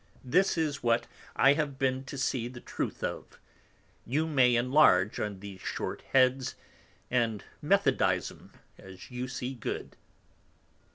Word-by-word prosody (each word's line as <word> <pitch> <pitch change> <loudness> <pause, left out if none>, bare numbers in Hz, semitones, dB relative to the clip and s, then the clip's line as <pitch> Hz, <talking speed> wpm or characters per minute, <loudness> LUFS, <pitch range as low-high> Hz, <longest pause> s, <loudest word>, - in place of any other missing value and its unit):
This 180 +9 +2
is 150 -3 -1
what 120 0 +2 0.3
I 135 - +6
have 145 -2 -2
been 130 0 0
to 140 - -7
see 130 -2 -1
the 120 0 -9
truth - - -5
of. - - -5 0.6
You 150 +6 0
may 130 -6 +4
enlarge 120 -6 +4
on 100 -3 -4
these 100 -2 -9
short - - -4
Heads, 130 0 +3 0.6
and 115 -4 0 0.2
methodize - - +2
'em - - -17 0.3
as 95 +4 -12
you 125 +1 -4
see 125 +1 -4
good. 120 - -5
125 Hz, 135 wpm, -29 LUFS, 120-135 Hz, 0.6 s, I